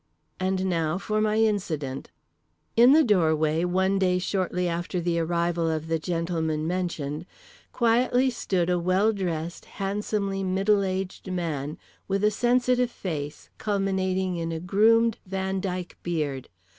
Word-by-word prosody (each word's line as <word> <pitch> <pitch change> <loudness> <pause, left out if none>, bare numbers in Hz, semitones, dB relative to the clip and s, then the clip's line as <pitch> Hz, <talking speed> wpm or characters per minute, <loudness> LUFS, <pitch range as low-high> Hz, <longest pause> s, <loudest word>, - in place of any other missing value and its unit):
And 190 0 0
now 165 -2 0
for 215 +2 -1
my 215 0 +2
incident: 170 -11 -1 0.7
In 240 +3 +7
the 315 +2 +7
doorway, 160 - +2
one 190 +2 +1
day 180 -1 +2
shortly 180 -1 -1
after 175 +1 -2
the 170 0 0
arrival 170 0 0
of 160 0 -3
the 165 0 +1
gentlemen 160 -2 -1
mentioned, 170 -3 -3 0.4
quietly 245 +2 +2
stood 185 -7 -1
a 180 -1 +1
well 185 +5 +2
dressed 170 -4 -3
handsomely 200 0 -1
middle 195 +2 +2
aged 190 0 -3
man, 155 -5 -3 0.3
with 195 +1 0
a 210 - +4
sensitive 250 +2 +2
face 150 -10 -6
culminating 190 -2 0
in 165 0 -3
a 165 - -3
groomed 225 +6 +3
Van 190 0 -2
Dyck 180 -2 -4
beard. 150 -6 -3
185 Hz, 135 wpm, -26 LUFS, 165-200 Hz, 0.7 s, In